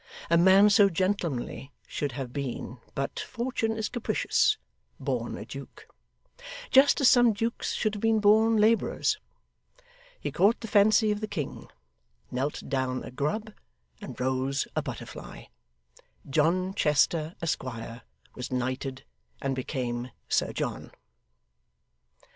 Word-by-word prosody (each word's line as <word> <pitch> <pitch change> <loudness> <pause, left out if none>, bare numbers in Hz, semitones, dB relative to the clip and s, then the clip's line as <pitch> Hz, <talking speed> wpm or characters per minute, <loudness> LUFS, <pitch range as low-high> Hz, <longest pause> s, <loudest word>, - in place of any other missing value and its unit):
A - - +6
man 190 +4 +6
so 205 -1 +6
gentlemanly 170 -8 -2
should 145 -3 -3
have 130 -2 -5
been 130 -3 -5 0.2
but 135 0 -3
Fortune 235 -2 -2
is 220 - -1
capricious 420 - +1 0.4
born - - -2
a - - -7
Duke: - - -10 0.8
just 270 +2 +6
as 270 - +6
some 240 -3 +6
dukes 230 +3 -2
should 215 -2 0
have 205 - -5
been 225 -1 +3
born 220 +2 +5
labourers. 225 - +2 1.0
He - - -4
caught 205 +4 +3
the 225 - -5
fancy 215 +1 +4
of 210 0 -2
the 215 - -2
king, 150 -9 -5 0.6
knelt 135 +4 -2
down 130 -2 -1
a - - -8
grub, 205 - -2 0.5
and 205 - -8
rose 130 +2 0
a - - +1
butterfly. - - -8 0.8
John 170 +6 +1
Chester, 155 -1 +2
Esquire, 120 -7 -4 0.3
was 125 - -6
knighted 130 +1 -3 0.4
and 135 -1 -1
became 125 -2 -3 0.2
Sir - - +1
John. - - -4
170 Hz, 125 wpm, -28 LUFS, 130-215 Hz, 1.0 s, A